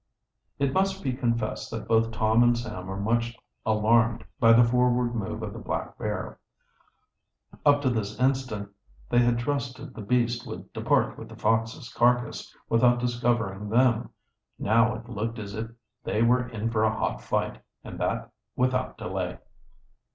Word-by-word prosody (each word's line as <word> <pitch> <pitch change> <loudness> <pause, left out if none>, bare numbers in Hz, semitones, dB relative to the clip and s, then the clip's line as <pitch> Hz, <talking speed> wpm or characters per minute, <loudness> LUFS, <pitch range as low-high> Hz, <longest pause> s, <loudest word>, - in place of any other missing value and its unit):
It 140 -1 0
must 195 +2 +1
be 130 -3 0
confessed 115 -3 -1
that - - -6
both 115 0 +3
Tom 110 +1 +2
and 120 0 +4
Sam 105 -6 -6
were 95 +1 -4
much 115 +2 0 0.3
alarmed 110 +1 +3 0.2
by 115 - +6
the 115 +1 +8
forward 125 0 +2
move 110 0 -3
of 105 -2 -5
the - - -7
black - - -4
bear. - - -4 1.3
Up 145 0 +5
to 130 - +3
this 110 -2 -3
instant 130 -6 0 0.4
they 120 - +5
had 120 -1 +3
trusted 130 +1 -3
the 115 - -8
beast 120 +2 0
would - - -8
depart - - +1
with - - -9
the - - -10
fox's 115 +4 0
carcass, 125 0 +1 0.2
without 120 +1 +4
discovering 120 -4 -1
them. 120 0 +3 0.5
Now 115 +1 +3
it 115 +2 -9
looked 115 0 -3
as 100 -2 -6
if 110 +2 -4 0.3
they 110 - +1
were 125 +1 +3
in 115 -1 -3
for 110 -1 +1
a 110 0 +1
hot - - -1
fight, - - -2 0.2
and - - -8
that - - -2 0.2
without 130 0 0
delay. - - -3
115 Hz, 160 wpm, -27 LUFS, 110-125 Hz, 1.3 s, the